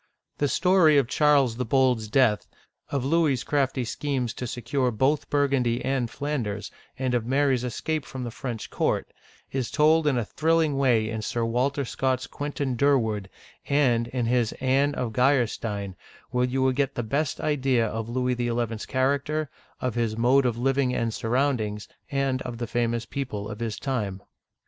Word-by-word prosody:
The 145 - +2
story 180 -1 +4
of 135 -4 +3
Charles 140 -5 +3
the 125 - -1
Bold's 125 -2 +2
death, 110 -2 +2 0.4
of 140 -3 -2
Louis's 145 -4 +2
crafty 135 -3 0
schemes 130 -1 -2
to 125 - -5
secure 125 +3 -1
both 130 +6 +1
Burgundy 135 -4 +1
and 130 -3 0
Flanders, 115 -8 -3 0.3
and 130 -1 -1
of 120 -2 0
Mary's 135 -1 +2
escape 150 +5 -2
from 130 0 -7
the 120 - -4
French 120 -2 -6
court, - - -1 0.4
is 130 -3 -2
told 155 +1 +3
in 135 -4 +2
a 120 - 0
thrilling 160 +3 +1
way 125 -5 +3
in 110 0 -3
Sir 115 +2 -1
Walter 135 +4 0
Scott's 130 +1 -1
Quentin 140 -3 -3
Djirward 110 -8 +1 0.4
and 125 -5 +3
in 125 -1 -2
his 120 -1 +1
Anne 135 +2 +1
of 125 -3 -2
Geiersteiuy - - -13 0.3
(gl'er - - -2
stin), 100 -5 -4 0.4
where 125 0 +2
you 130 +1 0
will 130 - +4
get 135 +1 -1
the 120 - -2
best 140 +6 -1
idea 135 -5 +1
of 110 +1 -4
Louis 125 +1 0
XL's 120 -2 -2
character, 140 +3 0 0.3
of 125 -2 -2
his 115 -2 -1
mode 125 +3 +4
of 115 -2 -1
living 135 +1 +1
and 115 -1 -1
sur 110 - -4
roundings, 115 -5 0 0.2
and 135 -2 0
of 120 -2 -5
the 120 - -3
famous 115 0 -1
people 110 -6 -4
of 105 +1 -7
his 115 -2 -3
time. 105 -9 -3
125 Hz, 175 wpm, -26 LUFS, 115-140 Hz, 0.4 s, story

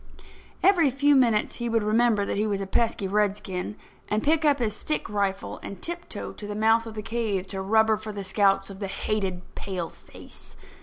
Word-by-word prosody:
Every 350 -6 +5
few 285 +2 +3
minutes 235 -5 +3
he 240 -1 -2
would 225 -1 +1
remember 215 -1 +3
that - - -2
he 210 +2 +1
was 200 -2 -1
a 195 - -3
pesky 205 0 0
redskin, 200 -1 -1 0.3
and 215 +1 0
pick 315 +2 +3
up 290 -2 +4
his 220 -5 -1
stick 305 +7 -2
rifle 200 -2 -2
and 200 - -8
tiptoe 345 - -5
to 205 - -9
the 205 - -4
mouth 225 +2 +3
of 220 - -8
the 215 - -5
cave 220 -4 -1
to 190 -1 -4
rubber 220 +2 +3
for 215 0 -7
the 205 -1 -5
scouts 195 0 +2
of 195 - -10
the 200 - -3
hated 195 -2 -2
paleface. 185 -4 -8
210 Hz, 195 wpm, -26 LUFS, 195-230 Hz, 0.3 s, Every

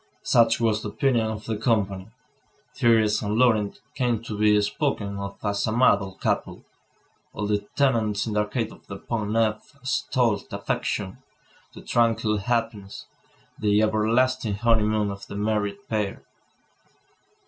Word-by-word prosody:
Such 115 -1 +4
was 110 -2 +1
the 105 - -4
opinion 120 -1 +1
of 110 -1 -5
the 110 - -2
company. 100 -4 0 0.7
Thérèse 110 -2 +3
and 105 +1 -1
Laurent 110 -5 +2
came 120 -4 0
to 110 -2 -5
be 105 0 +4
spoken 105 -5 -2
of 100 0 -6
as 100 0 0
a - - 0
model 100 -5 +3
couple. - - -2 0.7
All 105 - -3
the 105 0 +1 0.2
tenants 115 -7 +1
in 110 - -3
the 105 - +1
Arcade 110 +2 -1
of - - -17
the 100 - -7
Pont 105 +1 -3
Neuf 110 +3 -1
extolled 125 -5 0
the - - -4
affection, 95 -3 -3 0.6
the - - -10
tranquil 115 -2 +1
happiness, 110 -2 -3 0.5
the 105 -1 +3
everlasting 115 +1 +1
honeymoon 110 -2 +2
of 100 0 -9
the - - -8
married 105 -1 -2
pair. 105 -3 -2
110 Hz, 145 wpm, -25 LUFS, 105-115 Hz, 0.7 s, Such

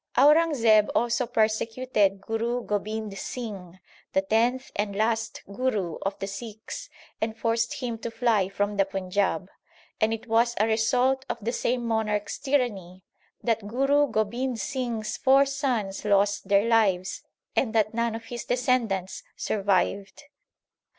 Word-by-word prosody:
2 - - +4
Aurangzeb 285 -9 +5
also 240 +1 +1
persecuted 220 -2 +1
Guru 230 +3 -2
Gobind 210 0 -3
Singh, 195 -7 -6 0.4
the 190 - +2
tenth 235 +6 +1
and 205 -1 -1
last 225 +1 -1
Guru 200 -5 -2
of 195 0 -2
the - - -4
Sikhs, 215 +2 -7 0.3
and 220 0 -2
forced 230 0 0
him 235 -3 -3
to 235 - -4
fly 225 -5 +1
from 205 +1 -1
the 195 - +4
Panjab; 195 0 -1 0.5
and 220 +1 +3
it 225 +1 -4
was 235 +1 +2
a 215 - +4
result 245 +4 +2
of - - -2
the 225 +2 -2
same 245 -1 -1
monarch 220 -2 0
s - - -5
tyranny 205 -10 -1 0.4
that 225 -3 0
Guru 275 +5 +3
Gobind 235 +2 -1
Singh 255 -6 -2
s 215 - -4
four 270 +1 +5
sons 255 -8 -2
lost 205 0 +2
their 200 +1 +4
lives 195 -5 +2 0.3
and 230 -4 +1
that 215 -1 +2
none 235 0 0
of 225 0 -7
his 240 +1 -6
descendants 240 -7 0
survived. 200 +2 0
225 Hz, 145 wpm, -26 LUFS, 205-245 Hz, 0.5 s, Aurangzeb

